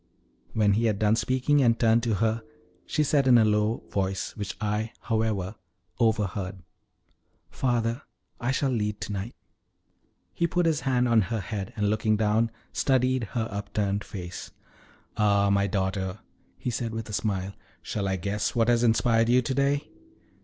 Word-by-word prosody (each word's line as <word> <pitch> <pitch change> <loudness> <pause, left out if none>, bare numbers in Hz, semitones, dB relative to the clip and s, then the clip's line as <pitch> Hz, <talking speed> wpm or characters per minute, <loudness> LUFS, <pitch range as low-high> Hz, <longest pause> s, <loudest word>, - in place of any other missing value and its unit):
When 105 -2 +3
he 115 +3 +1
had 110 -3 +1
done 105 +1 +3
speaking, 130 +4 +2
and 115 -3 +3
turned 115 0 +4
to 115 -2 0
her, 110 +2 0 0.5
she 150 - +1
said 140 -2 +2
in 125 -2 +7
a 110 - +5
low 105 +1 +1
voice, 95 -1 -2
which 100 -2 -5
I, 105 +2 -2
however, 110 -4 -1 0.5
overheard: 100 -4 0 0.9
"Father, 120 0 0 0.4
I 120 - -2
shall 135 0 +1
lead 105 -3 -1
to - - -4
night." 100 +4 -4 1.0
He 170 - +1
put 175 +1 +1
his 160 -3 +2
hand 125 -2 +1
on 115 -2 +4
her 115 -1 -1
head, 100 0 -5
and, 105 -1 +1
looking 110 0 +1
down, 110 +2 +2 0.2
studied 130 -2 +2
her 115 -2 0
upturned 100 0 -2
face. 90 -3 -7 0.7
"Ah, 100 -2 +3
my 100 0 +2
daughter," 95 0 -2 0.4
he 125 - -3
said 115 -1 -3
with 115 -1 -4
a 105 - -8
smile, 100 -2 -1 0.3
"shall 100 -2 -2
I 95 - 0
guess 100 +5 -2
what 115 0 +3
has 120 -1 +4
inspired 115 0 +3
you 125 +1 +4
to 130 - -1
day? 140 +2 0
110 Hz, 165 wpm, -27 LUFS, 100-120 Hz, 1.0 s, in